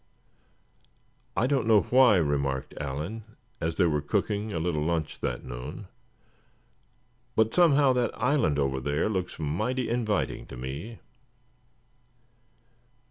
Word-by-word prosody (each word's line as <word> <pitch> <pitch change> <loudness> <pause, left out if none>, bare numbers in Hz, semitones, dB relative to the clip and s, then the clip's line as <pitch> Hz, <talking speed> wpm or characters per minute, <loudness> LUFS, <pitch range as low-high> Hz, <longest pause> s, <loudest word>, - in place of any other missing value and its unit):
"I - - +3
don't 135 -4 +1
know 110 -3 +6
why," 125 -4 +5
remarked 70 -5 0
Allan, 75 +11 -4 0.4
as 80 0 -2
they - - +3
were 75 -3 +1
cooking 105 +8 -1
a 85 - -2
little 80 -2 -1
lunch 80 -1 -2
that - - -3
noon; 60 0 -7 1.5
"but 110 0 +2
somehow 145 -6 +5
that 125 -3 -1
island 125 - +2
over 70 -2 0
there 75 +6 0
looks 95 -4 -3
mighty 110 - -1
inviting 110 -4 -1
to - - -9
me." 70 - -6
90 Hz, 120 wpm, -27 LUFS, 75-115 Hz, 1.5 s, know